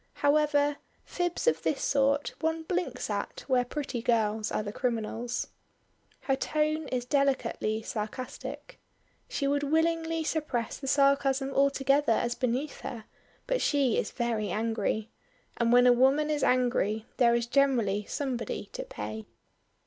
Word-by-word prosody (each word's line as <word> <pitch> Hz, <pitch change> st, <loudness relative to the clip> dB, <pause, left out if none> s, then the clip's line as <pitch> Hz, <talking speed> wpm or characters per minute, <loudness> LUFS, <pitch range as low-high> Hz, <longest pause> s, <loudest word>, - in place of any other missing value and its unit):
However, 290 Hz, 0 st, +2 dB, 0.3 s
fibs 350 Hz, -1 st, -2 dB
of 480 Hz, -, +2 dB
this 285 Hz, -, 0 dB
sort 280 Hz, +1 st, +2 dB
one 320 Hz, 0 st, -1 dB
blinks 360 Hz, +2 st, -2 dB
at -, -, -3 dB
where 255 Hz, -2 st, +2 dB
pretty 250 Hz, -2 st, -4 dB
girls 220 Hz, -2 st, +1 dB
are -, -, -1 dB
the 205 Hz, 0 st, -5 dB
criminals. 235 Hz, 0 st, -2 dB, 0.7 s
Her 270 Hz, -, +1 dB
tone 305 Hz, +2 st, 0 dB
is 250 Hz, -2 st, -2 dB
delicately 250 Hz, -5 st, 0 dB
sarcastic. 240 Hz, -, -6 dB, 0.5 s
She 395 Hz, -, -2 dB
would 285 Hz, +1 st, +1 dB
willingly 325 Hz, +2 st, +1 dB
suppress 295 Hz, -8 st, -2 dB
the 270 Hz, -, -6 dB
sarcasm 275 Hz, -1 st, +2 dB
altogether 275 Hz, -1 st, +3 dB
as 240 Hz, +2 st, 0 dB
beneath 255 Hz, +4 st, -2 dB
her, 225 Hz, -3 st, -6 dB, 0.4 s
but -, -, 0 dB
she 275 Hz, -5 st, +2 dB
is -, -, -2 dB
very 225 Hz, -3 st, -2 dB
angry; 220 Hz, +1 st, -1 dB, 0.5 s
and 235 Hz, -1 st, +2 dB
when 245 Hz, +1 st, +6 dB
a 250 Hz, -, +7 dB
woman 270 Hz, +5 st, +3 dB
is 295 Hz, -2 st, 0 dB
angry 235 Hz, -4 st, +1 dB
there 235 Hz, -2 st, +5 dB
is 235 Hz, -1 st, 0 dB
generally 235 Hz, -6 st, +2 dB
somebody 240 Hz, -7 st, -3 dB
to -, -, -4 dB
pay. 110 Hz, +1 st, -7 dB
265 Hz, 140 wpm, -29 LUFS, 230-290 Hz, 0.7 s, a